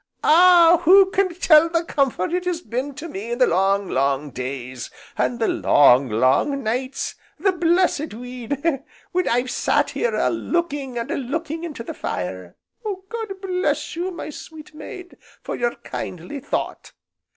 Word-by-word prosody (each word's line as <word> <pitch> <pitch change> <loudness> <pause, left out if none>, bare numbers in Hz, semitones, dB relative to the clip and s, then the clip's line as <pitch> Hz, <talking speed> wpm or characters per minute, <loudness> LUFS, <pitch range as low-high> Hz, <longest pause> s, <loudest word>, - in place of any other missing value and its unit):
"Ah! 345 0 +6
who 380 +2 +7
can 375 -3 +1
tell 330 -2 +5
the 335 0 0
comfort 275 - 0
it 360 0 -1
has 350 -2 -1
been 265 0 -4
to 300 +4 -7
me 220 - -6
in - - -3
the 255 - +5
long, 195 +1 +1
long 140 +1 0
days, 130 -1 -6 0.3
and 245 - 0
the 225 - 0
long, 135 -2 +4
long 130 - +2
nights, 255 +4 -2 0.3
the 390 +4 +3
blessed 345 -3 +1
weed! 250 +2 -5 0.5
when 365 0 0
I've 245 +2 0
sat - - +1
here 480 - -1
a - - +2
looking 290 -7 -2
and 235 +4 -3
a - - -1
looking 315 +5 -4
into 300 -9 -6
the - - -6
fire. 90 -1 -5 0.5
God 445 -4 -5
bless 365 -3 -1
you, 350 +3 -2
my 340 -3 -7
sweet 310 +1 -11
maid, 360 +3 -10 0.3
for - - -4
your 240 0 -1
kindly 180 - -7
thought!" - - -4
285 Hz, 160 wpm, -22 LUFS, 220-345 Hz, 0.5 s, who